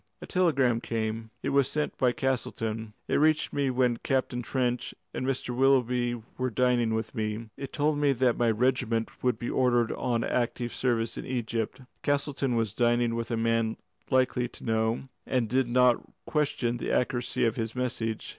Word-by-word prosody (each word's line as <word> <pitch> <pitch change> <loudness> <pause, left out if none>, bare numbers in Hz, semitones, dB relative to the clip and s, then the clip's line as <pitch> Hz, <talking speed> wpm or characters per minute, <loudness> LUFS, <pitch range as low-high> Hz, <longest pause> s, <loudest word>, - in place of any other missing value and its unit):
"A - - -8
telegram 140 - +2
came. 110 -1 -3
It - - 0
was 140 -1 +3
sent 150 +1 -2
by 125 -1 +4
Castleton. 115 -4 -2
It - - +2
reached 155 +1 +3
me 140 -2 +1
when 125 -2 +2
Captain 130 -1 -1
Trench 125 0 -1 0.2
and 130 - -3
Mr. 130 -2 -2
Willoughby 125 -2 +2 0.2
were 130 0 +1
dining 120 -2 +2
with 110 0 -3
me. 110 -1 -3
It 135 - -7
told 145 0 +1
me 145 -1 +4
that 125 -1 +2
my 120 -1 +2
regiment 115 -1 +1
would 125 -1 +1
be 120 - -3
ordered 120 -3 +2
on 120 -2 -1
active 120 -1 -1
service 115 -3 0
in - - -6
Egypt. 115 -2 -2 0.2
Castleton 140 -3 0
was 115 -3 0
dining 120 -1 +2
with 115 0 -3
a 115 - -1
man 115 0 +1 0.3
likely 130 -2 +2
to - - -14
know, 110 0 0 0.2
and 125 -2 +2
I 115 +3 -4
did 130 -2 +3
not 125 0 +4 0.2
question 135 -6 0
the - - -3
accuracy 120 -1 0
of 115 - +1
his 115 -1 -3
message. 115 -3 -2
120 Hz, 175 wpm, -28 LUFS, 115-130 Hz, 0.3 s, by